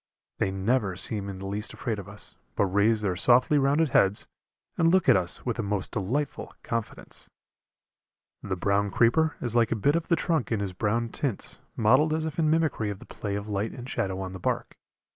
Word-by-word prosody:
They - - +1
never 95 +1 0
seem 100 +2 -1
in 95 - -6
the 95 - -7
least 100 +2 -2
afraid 115 -5 -3
of 100 0 -9
us, 105 0 -8 0.2
but 100 - +2
raise 105 +3 +2
their 95 -4 0
softly 125 - +4
rounded 145 +3 +2
heads 100 -3 +4 0.5
and 165 - +3
look 185 0 +3
at - - +7
us 90 -2 0
with 120 -1 -2
a - - +2
most 100 -2 -1
delightful 125 +8 -3
confidence. 115 -2 -4 1.1
The 95 -2 -3
brown 100 +2 +1
creeper 135 +10 +3
is 120 -2 0
like 115 -2 +3
a - - +2
bit 140 +8 +2
of 170 -1 -1
the 170 - +3
trunk 160 -7 -1
in 110 - +1
his 100 -2 -3
brown 115 +5 -1
tints, 125 -2 -2 0.2
mottled 135 +8 +4
as 160 0 -2
if 160 +1 -4
in 155 -2 +3
mimicry 155 -9 +1
of 100 - -4
the - - -13
play 100 -2 -5
of 100 +1 -4
light 105 +1 -2
and 125 -1 -8
shadow 95 -6 -2
on 95 -1 -5
the 95 - -7
bark. - - -2
110 Hz, 210 wpm, -27 LUFS, 100-135 Hz, 1.1 s, at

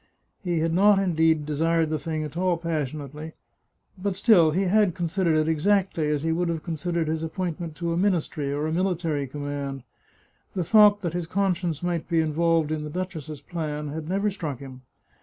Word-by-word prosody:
He 175 -2 0
had 165 0 0
not 200 +3 +5
indeed 160 -5 +2
de 150 0 -3
sired 165 +1 +1
the 155 - 0
thing 155 +1 -3
at 150 0 -7
all 180 0 +1
passionately, 155 -1 -4 0.7
but 195 0 -1
still 190 -5 +5
he 180 +6 +1
had 195 -1 +3
considered 170 -1 +1
it 155 0 +2
exactly 170 0 +1
as 150 -1 0
he 165 - +1
would 170 +1 0
have 165 -2 -3
considered 170 0 -2
his 160 0 -1
appointment 165 -1 -4
to 170 +1 -2
a - - -1
ministry 170 -7 0
or 145 +2 -1
a 155 - -1
military 165 -5 0
command. 140 -1 -5 0.7
The 185 - 0
thought 205 +2 +6
that 170 -4 -2
his 175 -2 -3
conscience 180 -4 -1
might 175 -2 -2
be 165 -2 +2
involved 160 0 +1
in 155 -1 -2
the 150 - -5
duchess's 155 -4 -5
plan 150 -1 -4
had 155 +2 -6
never 200 +2 +1
struck 160 -8 -4
him. 130 -1 -10
165 Hz, 190 wpm, -25 LUFS, 155-180 Hz, 0.7 s, thought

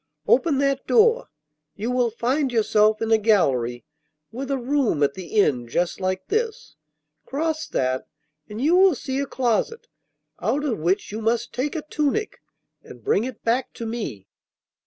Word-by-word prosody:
'Open 340 - +3
that 275 -1 0
door. 470 +2 +4 0.5
You 225 +4 -3
will 250 -1 +2
find 255 +5 0
yourself 215 -1 +3
in 225 - -1
a 220 - +5
gallery 130 - +1 0.5
with 260 +4 -5
a 275 - 0
room 255 - +1
at 140 -1 +2
the 190 +5 -2
end 125 -10 +2
just 175 +9 -1
like 185 0 -2
this. 450 +2 -2 0.5
Cross 315 +2 -2
that, 130 0 -1 0.4
and 210 +1 -7
you 310 +7 +3
will 375 -3 +6
see 265 +1 -3
a 280 - -2
closet, 265 - -1 0.6
out 290 +2 0
of 240 - -1
which 175 +6 0
you 215 +2 -5
must 235 +2 0
take 280 +6 -2
a 310 - -3
tunic, 305 +8 -2 0.4
and - - -14
bring 405 - +2
it 255 -3 -8
back 235 +3 0
to 230 - -6
me. 220 - -5
240 Hz, 165 wpm, -23 LUFS, 210-290 Hz, 0.6 s, will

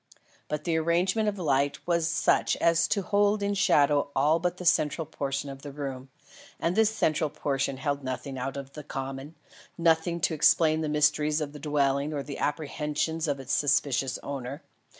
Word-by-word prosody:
But 150 - -3
the 165 -2 0
arrangement 180 +7 +1
of 205 - -5
light 145 -5 +1
was 170 -2 +1
such 165 - +2
as 170 0 +3
to 200 +1 0
hold 205 +2 +2
in 200 0 0
shadow 145 -7 +3
all 150 +5 +3
but 180 +1 -2
the 180 - -7
central 160 0 +2
portion 140 -2 -3
of 135 -1 -8
the 145 - -8
room; 135 -2 -6 0.5
and 170 +2 0
this 220 -1 +4
central 155 -8 0
portion 140 -2 -2
held 140 0 -2
nothing 130 +1 -5
out 130 +2 -4
of 140 0 -8
the 150 - -8
common 135 +3 -6 0.4
nothing 170 0 +2
to 160 - +1
explain 155 +1 +4
the 155 - -2
mysteries 150 0 +2
of 150 -2 -4
the 150 - -9
dwelling 140 0 0
or 140 -2 -3
the 140 -1 -7
apprehensions 150 +2 -2
of 140 -2 -1
its 135 +1 -4
suspicious 135 -3 +1
owner. 140 +1 -6
150 Hz, 180 wpm, -27 LUFS, 140-165 Hz, 0.5 s, this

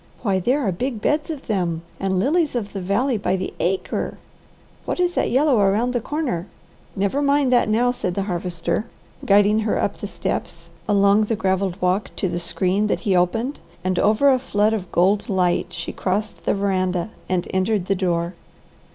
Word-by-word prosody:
Why 195 -4 +1
there 255 +10 +1
are 205 -8 +1
big 240 +6 -3
beds 300 +7 0
of 300 -4 -5
them. 175 -6 -1 0.2
And 190 -1 0
lilies 290 - +1
of 210 -4 -3
the 195 - -4
valley 215 +6 0
by 200 - 0
the 190 0 -4
acre! 190 +2 -1 0.7
What - - -3
is 355 -1 +2
that - - +1
yellow 270 -2 +3
around 210 +5 +2
the 245 - 0
corner?" 250 - -2 0.5
"Never 200 +8 0
mind 280 -2 +3
that 240 -3 +3
now," 240 +3 +3
said 180 -7 -3
the 195 - 0
Harvester, 180 +2 -2 0.4
guiding 205 +1 +4
her 220 -1 0
up - - -1
the - - -5
steps, - - -4 0.2
along 200 +1 +4
the 225 - -1
gravelled 190 -2 0
walk 180 +3 +1
to 190 - -1
the 175 - -2
screen 185 +4 0
that - - -1
he 200 -5 +1
opened, 225 +10 0 0.2
and 185 -1 0
over 220 +7 +4
a 260 - +3
flood 215 -4 +1
of 190 -5 -4
gold 200 +6 +2
light 180 -3 +1
she 170 -1 -4
crossed 205 +3 -3
the - - +2
veranda, 185 -1 0 0.2
and 180 -1 0
entered 190 0 +1
the 195 - +1
door. 175 -2 -1
200 Hz, 185 wpm, -22 LUFS, 185-240 Hz, 0.7 s, guiding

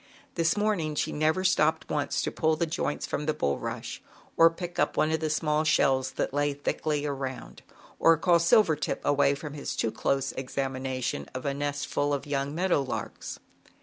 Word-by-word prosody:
77 - - -37
This 165 +2 +1
morning 195 -8 0
she - - -1
never 155 +5 +1
stopped 160 -3 +2
once 145 -1 -1
to - - -1
pull 160 0 +1
the 170 - 0
joints 155 -2 -2
from 150 - -3
the 155 - +1
bulrush, 70 0 -3 0.4
or 165 0 +7
pick 175 +1 -7
up - - +1
one 155 - +3
of 160 - +1
the 155 0 -1
small 150 0 +1
shells 130 -4 +2
that - - -2
lay 145 0 +1
thickly 150 +1 -1
around, 135 -2 -5 0.4
or 165 0 +6
call 170 +2 +4
Silvertip 170 -2 +2
away 140 -1 +3
from 145 0 -7
his 145 - -4
too 115 - 0
close 135 0 0
examination 130 - -3
of 130 - -5
a 140 - 0
nest 145 0 -2
full 145 0 0
of 140 - -6
young 140 0 -2
meadow 175 -3 +2
larks. 135 - -5
145 Hz, 185 wpm, -28 LUFS, 140-160 Hz, 0.4 s, or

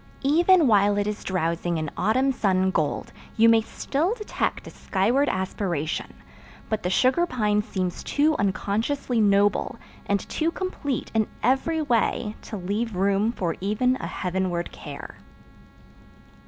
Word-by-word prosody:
Even 340 +4 +5
while 205 -3 +4
it 205 - +1
is 210 0 -4
drowsing 170 -1 -1
in 155 -2 -3
autumn 260 +6 +2
sun 190 -6 +1
gold 155 -5 -2 0.2
you 225 +1 +6
may 230 -1 +6
still 305 - -2
detect 425 -3 -3
a - - -9
skyward 235 +9 +1
aspiration, 185 -4 -2 0.6
but 220 -1 -1
the 180 - -1
sugar 260 - +3
pine 210 -6 +1
seems 185 -4 -3
too 305 +2 +2
unconsciously 220 +5 0
noble 205 +3 +2 0.3
and 200 -1 0
too 320 +1 0
complete 335 -7 -4
in 220 -2 +2 0.2
every 270 +7 +1
way 230 -4 0
to 215 - -7
leave 205 +4 -2
room 200 +4 +2
for 175 -7 -2
even 215 +6 +1
a - - -5
heavenward 180 -2 -2
care. - - -9
210 Hz, 140 wpm, -25 LUFS, 190-260 Hz, 0.6 s, you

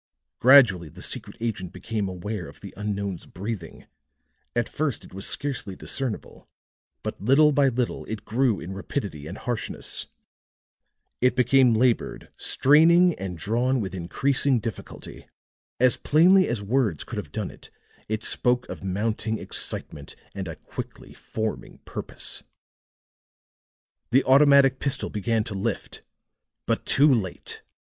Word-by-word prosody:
Gradually 115 - +6
the - - -14
secret - - -3
agent 105 -6 -3
became 100 +2 -3
aware 90 +1 -5
of 70 - -14
the 100 - -9
unknown's 100 -3 -4
breathing; 100 -2 -6 0.7
at 120 - +1
first 145 -5 -2
it - - -16
was 95 +1 -3
scarcely 135 -9 -3
discernible, 130 0 -4 0.5
but - - -5
little 140 +8 +5
by 140 -1 +4
little 125 -1 -1
it 110 -1 -6
grew 115 -3 +1
in 90 +3 -7
rapidity 95 - -5
and 95 +6 -7
harshness; 120 -2 -3 1.1
it 125 +1 +3
became 125 -1 +4
labored, 120 +1 +1
straining 170 +5 +5
and 95 -2 -5
drawn 120 +9 +1
with 95 -4 -4
increasing 130 +9 +1
difficulty; 110 -1 -8 0.5
as 125 0 +4
plainly 185 +5 +5
as 115 -4 -2
words 110 - 0
could - - -7
have - - -5
done - - -3
it, - - -15 0.4
it 110 0 -2
spoke 125 0 +1
of - - -7
mounting 110 +3 -1
excitement 70 -7 -4 0.2
and 95 -2 -5
a 85 - -6
quickly - - -9
forming 110 -1 -5
purpose. - - -3 1.7
The 135 +3 +4
automatic 140 -1 +6
pistol 140 - -1
began 110 +2 0
to 110 - -5
lift 100 +2 -4 0.6
but - - -1
too 140 +2 +5
late. 95 -7 -3
115 Hz, 135 wpm, -25 LUFS, 100-135 Hz, 1.7 s, Gradually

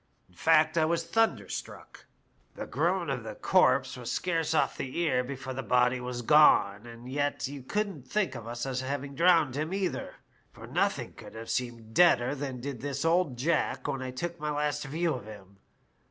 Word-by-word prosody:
In 90 - -26
fact, 160 - +3
I 155 - +4
was 165 +1 0
thunderstruck. 225 0 -2 0.5
The - - -5
groan - - 0
of - - -3
the - - -7
corpse - - +3
was - - -5
scarce 165 -3 0
off - - +2
the 130 +3 -5
ear 155 -7 +1
before 130 0 -6
the 135 - -4
body 125 0 +2
was 125 -1 -5
gone, 115 -7 +5
and 120 +1 -11
yet 145 +1 -1
you 140 0 -8
couldn't 190 -2 -3
think 200 -6 0
of 115 -3 -8
us 120 +1 -4
as 130 -1 -2
having 140 +1 -4
drowned 165 -4 +4
him 155 +3 -2
either, 195 -2 -3 0.4
for - - -12
nothing - - -1
could - - -12
have 115 0 -6
seemed 115 -3 -3
deader 140 -7 +4
than 135 -3 -5
did 135 -3 -5
this 140 +2 -3
old 165 -6 +2
Jack 135 -2 0
when 135 - -2
I 130 - -4
took 170 +7 -5
my 150 - -2
last 150 0 -1
view 160 +3 -1
of 125 -5 -6
him. 100 -2 -12
140 Hz, 190 wpm, -29 LUFS, 125-160 Hz, 0.5 s, gone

